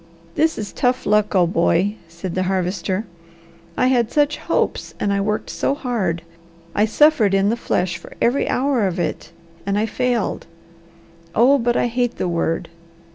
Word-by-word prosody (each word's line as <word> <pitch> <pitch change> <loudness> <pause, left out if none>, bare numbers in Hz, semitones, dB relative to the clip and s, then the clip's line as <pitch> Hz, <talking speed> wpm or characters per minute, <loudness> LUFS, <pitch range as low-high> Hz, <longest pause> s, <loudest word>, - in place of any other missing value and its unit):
"This 320 +2 +1
is 210 -2 -5
tough 250 +1 0
luck, 210 0 +2
old 175 -1 +3
boy," 175 +4 +2
said 170 +2 -6
the 185 - 0
Harvester. 190 +2 -1 0.7
"I - - +3
had 245 -3 +2
such 295 0 +2
hopes - - -2
and 200 - 0
I 200 - +1
worked 210 +1 -2
so 275 - 0
hard. 205 - -2 0.5
I 210 - +3
suffered 225 -4 +4
in 195 +1 +3
the 230 - +1
flesh 180 -6 -1
for - - -13
every 245 +4 +1
hour 255 -5 +1
of 180 -1 -3
it, - - -3 0.3
and 200 0 -1
I 215 - +2
failed. 240 -1 -1 0.9
Oh 265 +5 +5
but 240 0 +1
I - - +2
hate 245 0 -1
the - - -1
word! 165 -1 -1
210 Hz, 170 wpm, -21 LUFS, 185-245 Hz, 0.9 s, Oh